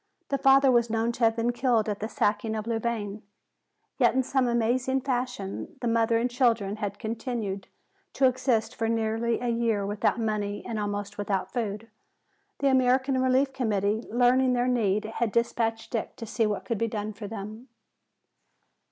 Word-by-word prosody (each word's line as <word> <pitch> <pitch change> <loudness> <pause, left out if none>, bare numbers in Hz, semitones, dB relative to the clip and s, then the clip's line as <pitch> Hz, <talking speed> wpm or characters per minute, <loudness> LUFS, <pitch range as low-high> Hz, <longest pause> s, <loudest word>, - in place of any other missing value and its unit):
The 275 - 0
father 270 0 +6
was 235 -1 +3
known 225 +1 0
to 235 0 +1
have 225 0 +3
been 230 +1 +1
killed 240 -3 +1
at 205 -1 -2
the 215 - -4
sacking 215 +1 0
of 215 -1 -3
Louvain. 225 -3 -2 0.8
Yet - - +4
in 260 - +3
some 265 0 +1
amazing 245 +3 +1
fashion 245 -7 -3
the 240 - -2
mother 230 0 +2
and 235 +2 +1
children 230 -5 +1
had 205 -2 -4
continued 220 -4 -4 0.5
to 270 - +3
exist 255 -3 +1
for 225 0 -1
nearly 225 +1 0
a 245 - -2
year 230 -3 0
without 205 +3 0
money 210 -2 -2
and 225 -2 -3
almost 205 0 -4
without 200 -2 -2
food. 220 -2 -3 0.7
The 280 - +3
American 260 0 +3
Relief 260 +1 +2
Committee, 215 -3 0
learning 250 +2 +3
their 245 0 +1
need, 215 -4 +1
had 225 0 -2
despatched 225 0 -1
Dick 225 - -3
to 230 - -7
see 225 0 0
what 210 - -3
could 230 -4 -2
be 230 - +1
done 215 -1 -4
for 205 0 -7
them. 215 +3 -7
230 Hz, 170 wpm, -27 LUFS, 215-245 Hz, 0.8 s, father